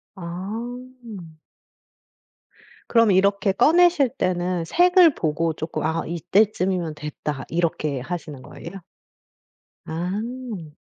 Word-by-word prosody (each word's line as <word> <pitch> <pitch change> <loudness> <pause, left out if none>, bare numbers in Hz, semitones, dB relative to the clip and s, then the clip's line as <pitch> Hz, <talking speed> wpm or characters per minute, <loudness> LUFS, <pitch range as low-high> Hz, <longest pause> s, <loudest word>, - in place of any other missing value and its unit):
아. 190 - -11 2.7
그럼 230 -3 +4
이렇게 200 +1 +3
꺼내실 330 - +4
때는 180 -1 -1
색을 355 - +5
보고 160 - -1
쪼끔 155 +1 -4
"아 160 +1 0
이때쯤이면 180 -1 0
됐다." 150 -2 -5
이렇게 160 -4 -1
하시는 150 -1 -6
거예요? 160 +7 -10 1.0
아. 200 +2 -5
180 Hz, 195 characters per minute, -23 LUFS, 160-215 Hz, 2.7 s, 색을